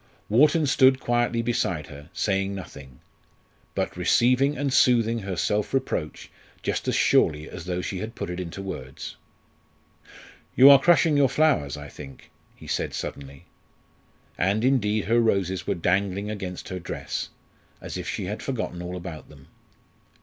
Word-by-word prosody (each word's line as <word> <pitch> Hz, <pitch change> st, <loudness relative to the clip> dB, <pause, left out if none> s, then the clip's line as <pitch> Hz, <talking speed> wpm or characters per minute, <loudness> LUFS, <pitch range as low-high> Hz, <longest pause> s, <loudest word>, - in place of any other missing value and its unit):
Wharton 150 Hz, +8 st, +4 dB
stood 130 Hz, -1 st, +4 dB
quietly 120 Hz, -1 st, 0 dB
beside 90 Hz, -9 st, -1 dB
her, 75 Hz, +2 st, -12 dB
saying 95 Hz, 0 st, -1 dB
nothing, 70 Hz, -8 st, -10 dB, 0.7 s
but -, -, -2 dB
receiving 130 Hz, +4 st, +3 dB
and 140 Hz, -2 st, -1 dB
soothing 115 Hz, -3 st, +3 dB
her 95 Hz, -3 st, -4 dB
self 105 Hz, +7 st, -1 dB
reproach 85 Hz, -11 st, -3 dB, 0.3 s
just -, -, -2 dB
as -, -, +1 dB
surely 75 Hz, 0 st, +3 dB
as 85 Hz, -2 st, -9 dB
though 90 Hz, 0 st, -2 dB
she 95 Hz, -, -4 dB
had 110 Hz, +4 st, -6 dB
put -, -, -5 dB
it 90 Hz, -, -5 dB
into 90 Hz, +2 st, -6 dB
words. 65 Hz, -9 st, -7 dB, 1.4 s
"You 135 Hz, +2 st, +9 dB
are 140 Hz, -, +7 dB
crushing 165 Hz, -3 st, +4 dB
your 140 Hz, -2 st, +4 dB
flowers, 130 Hz, -, +1 dB
I 75 Hz, 0 st, -8 dB
think," 70 Hz, -1 st, -12 dB, 0.2 s
he -, -, -14 dB
said -, -, -2 dB
suddenly. 70 Hz, 0 st, -7 dB, 0.9 s
And 100 Hz, +5 st, +1 dB
indeed 110 Hz, -6 st, +1 dB
her 115 Hz, +3 st, +3 dB
roses 95 Hz, -5 st, 0 dB
were -, -, 0 dB
dangling 100 Hz, +4 st, 0 dB
against 95 Hz, -4 st, -6 dB
her 95 Hz, -, -4 dB
dress, -, -, -5 dB, 0.5 s
as -, -, -7 dB
if -, -, -4 dB
she -, -, -3 dB
had 105 Hz, +4 st, -5 dB
forgotten 110 Hz, -9 st, -4 dB
all 90 Hz, +1 st, -5 dB
about 85 Hz, -3 st, -8 dB
them. 70 Hz, -3 st, -17 dB
100 Hz, 155 wpm, -25 LUFS, 85-120 Hz, 1.4 s, You